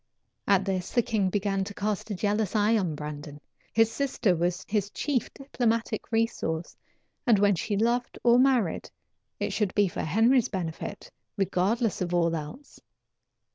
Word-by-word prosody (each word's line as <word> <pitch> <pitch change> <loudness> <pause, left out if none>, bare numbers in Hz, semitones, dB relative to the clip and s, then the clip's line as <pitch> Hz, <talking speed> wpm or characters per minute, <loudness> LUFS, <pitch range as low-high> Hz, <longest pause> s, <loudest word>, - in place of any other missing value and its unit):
At 195 -1 +3
this 185 -2 -2
the 240 - +3
king 205 -5 0
began 195 0 0
to 200 +1 -8
cast 210 +1 -2
a 205 - -2
jealous 205 +1 0
eye 215 +2 +3
on 180 -8 0
Brandon. 150 0 -7 0.3
His 225 0 +3
sister 245 -7 +1
was 175 +2 -1
his 205 -2 0
chief 265 +2 -2
diplomatic 230 -5 -2
resource, 225 -8 -1 0.5
and 230 -3 +6
when 200 0 +4
she 200 +3 -2
loved 235 +3 0
or 240 0 +6
married, 255 -9 +2 0.5
it - - -2
should 205 -4 -1
be 205 -1 +4
for 175 - -4
Henry's 230 - +3
benefit, 170 -5 -5 0.3
regardless 200 +4 0
of 175 -1 -1
all 170 -1 +2
else. 160 - -8
205 Hz, 155 wpm, -27 LUFS, 180-230 Hz, 0.5 s, and